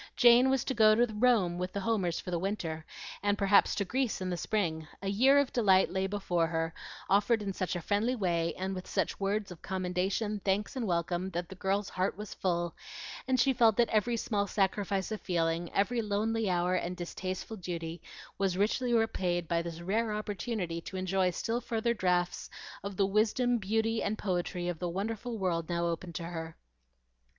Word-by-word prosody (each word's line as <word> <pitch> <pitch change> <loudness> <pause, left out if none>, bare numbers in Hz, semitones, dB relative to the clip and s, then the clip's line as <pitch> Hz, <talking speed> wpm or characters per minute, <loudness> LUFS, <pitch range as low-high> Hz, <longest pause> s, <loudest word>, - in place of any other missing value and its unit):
Jane 245 +1 +7
was 265 -2 +2
to 265 - -2
go 215 -3 +6
to 235 -1 +2
Rome 210 -6 +3
with 180 +1 -3
the 200 - -2
Homers 190 -6 0
for 180 - -6
the 170 - 0
winter, 165 -5 -3 0.4
and 205 0 +1
perhaps 200 0 +4
to 200 - 0
Greece 255 +3 -1
in 185 -1 -3
the - - 0
spring. 165 -4 -1 0.2
A - - -2
year 260 +8 +5
of 285 -2 +2
delight 195 -6 +4
lay 190 +1 0
before 180 -4 0
her, 165 0 -2 0.3
offered 210 +3 +3
in 195 -1 -3
such 185 0 -2
a 175 - -3
friendly 215 +8 +1
way, 170 -6 0
and 190 +1 -2
with 185 -1 -6
such - - -1
words 200 0 -1
of 175 - -10
commendation, 190 +3 -1
thanks, 200 +4 0
and 245 -4 -2
welcome, 175 +1 -1
that 175 -1 -4
the - - -7
girl's 195 +1 -1
heart 185 +2 -1
was 210 -1 -6
full, 175 -2 -1 0.5
and 260 -1 +2
she 265 +2 +4
felt 230 -4 +4
that 240 -1 +4
every 230 +2 +1
small 205 -2 0
sacrifice 195 0 0
of 215 - -3
feeling, 170 -1 0
every 230 +4 +1
lonely 215 +1 0
hour, 180 0 +1
and 180 0 -1
distasteful 185 +4 -5
duty 170 -2 -5 0.4
was 190 -2 +1
richly 240 +4 +1
repaid 180 -6 0
by 170 0 +1
this 170 0 -6
rare 215 +5 0
opportunity 205 -4 -3
to 190 - -7
enjoy 185 0 +1
still 230 +7 -2
further 235 0 0
draughts 180 -4 0 0.3
of 200 -1 -5
the 195 - +4
wisdom, 225 +4 +2
beauty, 220 +3 0
and 215 +2 -1
poetry 180 -2 -2
of 175 -3 -3
the 175 - -2
wonderful 225 +6 -3
world 170 -4 -1
now 170 0 0
open 170 +1 -3
to 165 +1 -5
her. 165 -1 -6
195 Hz, 195 wpm, -31 LUFS, 175-220 Hz, 0.5 s, Jane